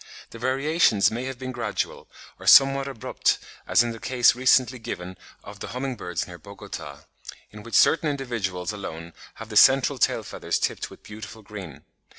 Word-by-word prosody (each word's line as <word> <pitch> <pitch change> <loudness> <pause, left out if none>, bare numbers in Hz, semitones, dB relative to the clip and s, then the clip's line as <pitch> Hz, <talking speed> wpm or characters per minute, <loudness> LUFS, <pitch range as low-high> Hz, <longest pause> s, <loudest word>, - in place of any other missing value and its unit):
The 115 - -10
variations 135 - +2
may 120 +3 -4
have 130 -1 -5
been 130 0 -6
gradual, 120 -2 -4 0.3
or - - -10
somewhat 135 0 +7
abrupt 135 -6 -1 0.3
as - - +4
in 120 - -3
the 115 - -8
case 125 -2 +3
recently 125 0 +3
given 90 -4 -6 0.3
of 100 0 -11
the - - -6
humming 130 0 -3
birds 90 -5 -4
near 90 -1 -11
Bogota, 80 -6 -9 0.5
in 105 - -11
which 115 +2 -6
certain 160 -1 +4
individuals 110 -11 -3
alone 85 -4 -7 0.2
have 115 0 -10
the 105 - -7
"central 135 +2 +5
tail - - +1
feathers - - -3
tipped - - -2
with - - -16
beautiful 110 +1 -10
green." 100 -8 -10
115 Hz, 170 wpm, -25 LUFS, 100-130 Hz, 0.5 s, somewhat